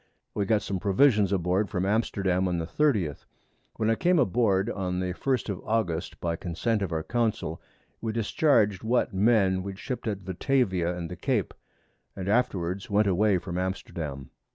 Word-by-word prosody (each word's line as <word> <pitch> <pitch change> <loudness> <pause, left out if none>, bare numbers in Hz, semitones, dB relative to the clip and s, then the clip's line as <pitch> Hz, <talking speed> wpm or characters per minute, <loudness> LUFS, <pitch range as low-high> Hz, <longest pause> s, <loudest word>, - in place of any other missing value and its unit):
We 100 -2 -1
got 110 -3 +2
some 95 -1 -3
Provisions 105 0 +3
aboard 95 +2 +1
from 90 -2 -1
Amsterdam 95 -3 +1
on 90 -1 -1
the 85 - -2
30th. 100 - 0 0.5
When 110 0 +1
I - - +4
came 175 +9 +2
aboard, 105 - +2
on 90 -5 -2
the 90 -1 -2
1st 130 +5 -1
of 100 - -3
August, 100 -7 -1
by 85 -1 -1
Consent 100 +7 -1
of 95 -3 -2
our 80 -1 -1
Council, 110 -9 -1 0.4
we 115 - -2
discharg'd 110 - +2
what 120 0 +1
Men 95 -2 +3
we 100 0 -6
ship't 125 +5 -5
at 100 -3 -3
Batavia 95 - 0
and 85 -1 -4
the - - -4
Cape, 110 +2 -1 0.6
and 95 -1 -5
afterwards 100 -5 0
went 105 +1 +3
away 100 +1 +3
from 90 0 -4
Amsterdam. 85 -7 -4
100 Hz, 170 wpm, -27 LUFS, 90-110 Hz, 0.6 s, I